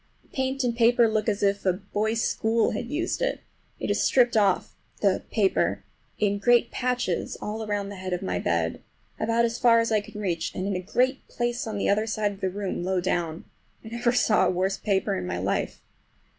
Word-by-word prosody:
The - - -29
paint 265 0 -1
and 240 -2 0
paper 235 0 +5
look 220 0 0
as 205 -1 -1
if 200 0 +1
a 185 - +3
boys' 210 +4 -1
school 225 0 +1
had 235 +3 -4
used 330 - -2
it. - - -1 0.4
It - - -1
is - - +1
stripped 245 -3 +3
off—the 200 -1 0
paper—in 205 0 -1
great 240 +4 +4
patches 250 -8 -1
all 215 +1 -4
around 205 -2 -2
the 200 - -8
head 185 0 -5
of 180 - -2
my 90 -1 -1
bed, 85 -1 -1 0.4
about 230 +2 +2
as 230 0 -2
far 235 -2 +6
as 230 0 0
I 215 -1 +3
can 210 - -10
reach, 175 -5 -2
and 185 - -2
in 200 -1 -1
a - - -1
great 255 +8 0
place 240 +1 -2
on 215 -2 -3
the - - 0
other 215 +2 +2
side 215 -1 0
of 200 0 -12
the 190 - +1
room 195 -2 -3
low 185 0 0
down. 175 -2 -2 0.4
I - - -7
never 235 +1 +1
saw 230 -3 +3
a - - +2
worse 185 +2 0
paper 195 -3 0
in 90 -1 -3
my - - -2
life. - - -2
210 Hz, 210 wpm, -26 LUFS, 190-235 Hz, 0.4 s, far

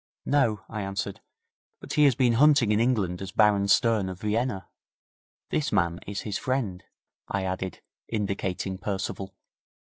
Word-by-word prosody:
'No,' 120 -8 +2
I 110 -2 -5
answered. 95 -2 -4 0.6
'But - - -7
he 150 - +5
has 135 -4 +5
been 120 -1 +3
hunting 140 -3 +5
in 105 - +3
England 105 -8 +1
as 95 -1 -5
Baron 105 -1 +4
Stern, 105 -1 +3
of 90 0 -7
Vienna. 105 -1 -1 0.8
This 150 -1 0
man 85 -4 +1
is 100 0 -4
his 105 -2 -3
friend,' 120 -9 -2 0.4
I 100 -1 -2
added, 95 0 -4 0.3
indicating 95 -3 -2
Percival. 95 -1 -4
105 Hz, 145 wpm, -27 LUFS, 95-115 Hz, 0.8 s, he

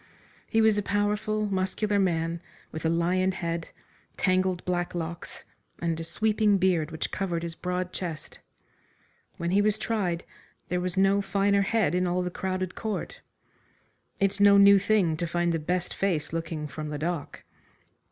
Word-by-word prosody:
He 225 - +2
was 220 -1 +4
a - - 0
powerful, 210 +1 0
muscular 200 +1 0
man, 165 -3 0 0.3
with 160 +1 -3
a - - +2
lion 180 +3 +1
head, 170 -2 -3 0.5
tangled 185 -1 +1
black 175 -1 -1
locks, 170 0 -6 0.3
and 165 -1 -2
a - - -3
sweeping 215 +3 +2
beard 180 -5 +2
which 160 -1 -4
covered 175 -4 -2
his 170 -1 -4
broad 180 +1 -3
chest. 165 -4 -6 1.0
When 170 +1 -2
he 200 +2 +4
was 210 0 +2
tried, 195 -7 -1 0.5
there 180 0 0
was 180 +1 -3
no 195 +1 +4
finer 200 +1 +2
head 215 -1 +1
in 180 0 +1
all 180 +1 0
the 180 - -3
crowded 185 0 -3
court. 220 -2 -4 1.0
It's 195 0 +1
no 200 0 +7
new 200 0 +8
thing 190 -6 +2
to 170 +1 -2
find 175 0 0
the 165 - 0
best 175 +3 -2
face 170 -6 -1
looking 165 -2 -3
from 150 +1 -6
the 150 - -4
dock. 165 0 -4
180 Hz, 160 wpm, -27 LUFS, 170-200 Hz, 1.0 s, new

